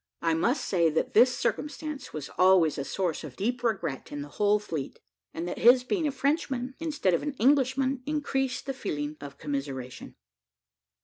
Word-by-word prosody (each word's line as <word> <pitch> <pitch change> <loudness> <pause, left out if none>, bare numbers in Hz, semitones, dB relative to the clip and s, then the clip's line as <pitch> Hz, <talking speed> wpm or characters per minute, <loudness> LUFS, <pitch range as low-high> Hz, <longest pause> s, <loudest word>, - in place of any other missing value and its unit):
I 165 -1 +2
must 235 - +1
say, 170 -4 +3
that 160 - -1
this 250 +3 +5
circumstance 300 -1 -3
was 150 -2 -6
always 180 -5 +5
a - - -1
source 175 +2 -2
of 140 -5 -8
deep 235 - -1
regret 195 - -2
in 145 0 -4
the 145 - -10
whole 210 0 +4
fleet, 165 -9 -5 0.3
and 165 +2 -4
that 175 - -4
his 245 +2 +6
being 320 +4 0
a - - 0
Frenchman, 270 -2 -1
instead 300 - 0
of 170 - +2
an 295 - -3
Englishman, 265 +1 +2
increased 270 -3 -1
the 270 - -2
feeling 150 - -4
of 140 -1 -9
commiseration. 135 -3 -5
210 Hz, 175 wpm, -28 LUFS, -, 0.3 s, his